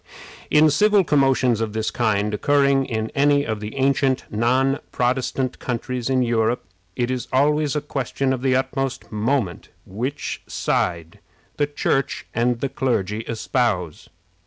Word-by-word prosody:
In 150 0 +5
civil 210 +4 +4
commotions 135 -6 +2
of 110 -2 -2
this 110 0 -1
kind 105 -3 0
occurring 140 +3 +2
in 110 -2 -3
any 145 0 +3
of 110 -1 -3
the 105 +3 -7
ancient 135 -1 +1
non 130 +5 +2
Protestant 130 +1 -1
countries 125 0 -3
in 130 -1 +2
Europe, 115 -1 0 0.3
it 120 0 -1
is 125 -1 -3
always 150 +2 +2
a 150 - 0
question 135 -2 -2
of 130 - -3
the 130 -1 +2
utmost 135 0 -2
moment 110 -3 -1 0.2
which 125 +9 -4
side 85 -1 -2 0.4
the 145 - +1
Church 140 -2 -1
and 120 0 0
the 140 - -1
clergy 105 -6 -1
espouse. 110 - -1
130 Hz, 140 wpm, -22 LUFS, 115-135 Hz, 0.4 s, In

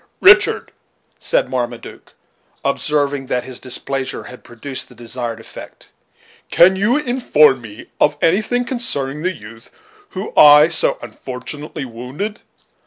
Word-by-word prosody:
"Richard," 385 +1 +5 0.5
said - - +1
Marmaduke, 120 -2 -6 0.5
observing 145 -2 -1
that 125 - -1
his 125 -1 -8
displeasure 135 +1 -3
had 125 - -12
produced 130 +3 -6
the 125 - -15
desired 120 0 -5
effect, 115 - -12 0.6
"can 185 +3 +5
you 210 +8 +2
inform 240 - +3
me 110 -1 -11
of 145 0 +2
anything 215 +10 +1
concerning 150 - -3
the 185 +3 0
youth 115 - -13 0.4
whom 190 +3 -6
I 150 +1 +8
so 165 - 0
unfortunately 135 +5 -7
wounded? 130 - -6
140 Hz, 120 wpm, -18 LUFS, 125-185 Hz, 0.6 s, I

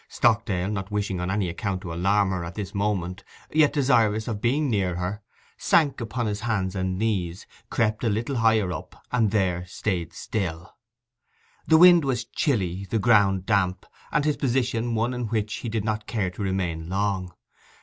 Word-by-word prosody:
Stockdale, 110 -6 +1
not 95 -1 -4
wishing 105 -3 -2
on 90 +1 -2
any 95 -1 0
account 95 +2 -3
to 85 -4 -6
alarm 95 +3 +2
her 90 -2 -2
at 85 +1 -7
this 100 -2 -5
moment, 100 -2 -2 0.3
yet 155 -1 +5
desirous 115 -6 +2
of 110 -3 -3
being 140 +5 +1
near 95 -7 0
her, 90 +4 -3 0.4
sank 145 -6 +2
upon 115 +1 -2
his 105 -1 -2
hands 100 -4 -1
and 95 -1 -1
knees, 95 -5 -1 0.2
crept 110 -1 0
a 115 - +2
little 115 +6 -1
higher 110 -5 +3
up, - - -9
and 115 -4 +2
there 95 -4 0
stayed 90 -3 -3
still. 90 -1 -4 0.9
The 160 - +6
wind 175 -1 +8
was 125 -4 -1
chilly, 100 - -1
the 115 - +1
ground 100 -4 +3
damp, 95 -3 +1 0.3
and 150 -3 +1
his 150 -1 +1
position 120 -3 0
one 115 +3 0
in 125 -2 -3
which 105 -1 -2
he 120 - -5
did 110 -2 -2
not 110 -1 -2
care 100 -6 -1
to 95 - -9
remain 90 -4 -2
long. 95 -2 -1
105 Hz, 180 wpm, -25 LUFS, 95-115 Hz, 0.9 s, wind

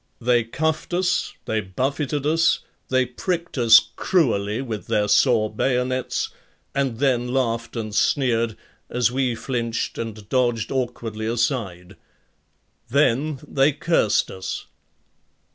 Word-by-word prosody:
They 120 0 +3
cuffed 160 +8 -2
us, 180 0 0
they 110 -1 0
buffeted 135 +8 -2
us, 165 +2 +3 0.3
they 130 0 +3
pricked 170 +7 -3
us 115 -1 +8 0.2
cruelly 115 - +1
with 115 -6 -5
their 105 -1 +1
saw 110 +1 +4
bayonets 125 +3 -1 0.4
and 135 -4 -1
then 125 -2 +1
laughed 115 -3 -1
and 110 -2 -4
sneered 115 -1 +1 0.3
as 120 -1 +1
we 130 -2 0
flinched 115 -1 -3
and 110 -3 -6
dodged 120 -3 0
awkwardly 115 -4 -3
aside. 105 - -2 0.9
Then 140 +2 +2
they 140 +2 +3
cursed 160 -8 +1
us. 95 0 -5
120 Hz, 115 wpm, -23 LUFS, 115-135 Hz, 0.9 s, us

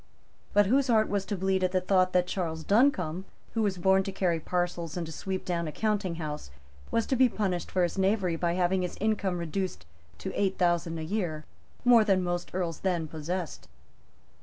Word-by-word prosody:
But 205 0 +5
whose 265 +7 +3
heart 220 -3 +3
was 200 -1 -1
to 205 - -2
bleed 190 0 +1
at 185 0 +1
the 185 - +3
thought 185 0 +2
that 180 -1 +3
Charles 165 -4 -3
Duncombe, 190 - +2 0.3
who 225 - 0
was 200 -3 0
born 190 +2 +4
to 195 - -3
carry 180 -3 0
parcels 175 -1 -2
and 175 - -2
to 160 - -8
sweep 190 +3 -4
down 170 -2 -1
a - - -3
counting 205 -2 -1
house, 150 - -5 0.4
was 230 - +1
to 265 - 0
be 255 0 +5
punished 190 -6 -2
for 185 - +1
his 175 +3 -1
knavery 190 -3 +2
by 170 +1 0
having 185 +1 +1
his 180 - -4
income 205 -4 0
reduced 170 - -3 0.3
to 85 - -5
eight 195 -1 0
thousand 175 -2 +1
a 160 - -4
year, 160 -4 -2 0.4
more 240 -2 +7
than 195 -3 +2
most 175 0 -2
earls 170 -3 -2
then 175 -4 -1
possessed? 160 +3 -5
185 Hz, 200 wpm, -28 LUFS, 170-200 Hz, 0.4 s, more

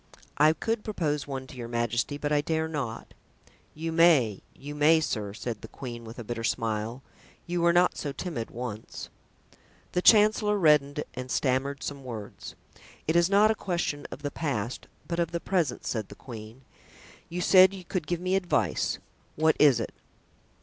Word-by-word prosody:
"I 155 +1 +6
could 225 +7 -2
propose 155 -9 -2
one 135 -2 -4
to 130 - -12
your 120 -2 -6
majesty, 120 +4 -1
but 145 0 -3
I 145 -1 +3
dare 160 +1 -1
not." 135 -8 -5 0.6
"You 165 +2 -3
may, 160 - +4
you 145 +2 -8
may, 150 +2 +5
sir," 105 -9 -2
said 115 -2 -5
the - - -8
queen 120 -3 -8
with 110 +1 -10
a 120 - -6
bitter 115 +1 -4
smile; 115 +2 -2 0.4
"you 175 0 -1
were 170 0 +5
not 175 +1 +3
so 145 - -3
timid 135 -5 -5
once." 115 -3 -6 0.8
The 180 - 0
chancellor 210 0 +5
reddened 150 -4 +3
and 130 0 -6
stammered 135 +2 0
some 140 -1 -5
words. 110 -5 -8 0.5
"It 160 - +1
is 170 +1 +4
not 205 +2 +5
a - - +3
question 175 -8 -2
of 145 - -9
the 145 - -2
past, 125 -6 -3 0.2
but 170 0 -2
of 170 -1 +1
the 170 0 -3
present," 165 -9 -1
said 110 -4 -3
the - - -10
queen; 115 0 -10 0.7
"you 175 - -4
said 185 +1 +7
you 190 -2 -9
could 170 -4 -3
give 175 +1 -1
me 185 +1 0
advice—what 160 -3 0
is 140 -6 +6
it?" 115 - -4
145 Hz, 175 wpm, -28 LUFS, 120-170 Hz, 0.8 s, said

